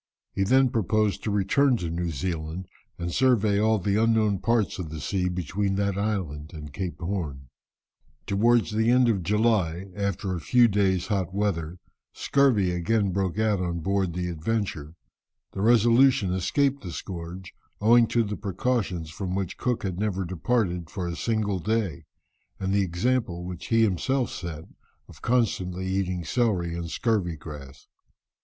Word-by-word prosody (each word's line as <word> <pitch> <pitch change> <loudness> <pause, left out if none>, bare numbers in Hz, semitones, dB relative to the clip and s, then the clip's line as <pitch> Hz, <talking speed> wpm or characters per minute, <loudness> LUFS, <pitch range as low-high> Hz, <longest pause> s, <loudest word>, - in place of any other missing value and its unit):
He - - -2
then 130 +5 +4
proposed 110 -2 +1
to - - -1
return 110 +7 +3
to 85 -5 -4
New 85 +1 -2
Zealand 85 +2 -4 0.3
and 85 0 -4
survey 110 -6 +3
all 110 +1 +3
the 100 +2 +1
unknown 110 -3 +2
parts 110 -1 0
of 85 -4 -4
the 80 0 -6
sea 90 +3 -1
between 90 +3 -1
that 100 -1 0
island 95 -7 -3
and 75 -2 -9
Cape 90 +1 -4
Horn. 80 -8 -4 0.8
Towards 115 +3 +2
the 110 +2 +1
end 125 0 +5
of 100 -5 +1
July, 100 -2 +1
after 100 -1 -2
a 85 - -4
few 120 +7 +5
days' 95 -4 +1
hot 95 -2 -2
weather, 90 -5 -1 0.4
scurvy 125 -10 +2
again 100 +3 +1
broke 95 0 -1
out 110 -3 +2
on 85 -2 -2
board 95 -1 0
the 90 0 -2
Adventure. 85 -3 -3 0.6
The 95 - -5
Resolution 120 -1 +4
escaped 135 +10 +1
the 90 - -7
scourge, 90 +1 -7 0.3
owing 115 +2 +5
to 120 +1 +2
the 105 -1 -4
precautions 95 -5 -2
from 95 +1 -4
which 95 -3 -3
Cook 125 -2 -1
never 95 0 -2
departed 90 -1 -1
for 90 -3 -4
a 85 - -3
single 105 -2 -1
day, 105 -5 -1 0.5
and 95 0 -1
the 100 - +3
example 95 0 -1
which 90 -1 -7
he 115 -1 +3
himself 120 +6 0
set 85 -3 -6 0.4
of - - -15
constantly 95 -7 0
eating 95 -2 -1
celery 90 -3 0
and 85 -1 -4
scurvy 100 -5 0
grass. 70 -3 -10
95 Hz, 155 wpm, -26 LUFS, 85-110 Hz, 0.8 s, end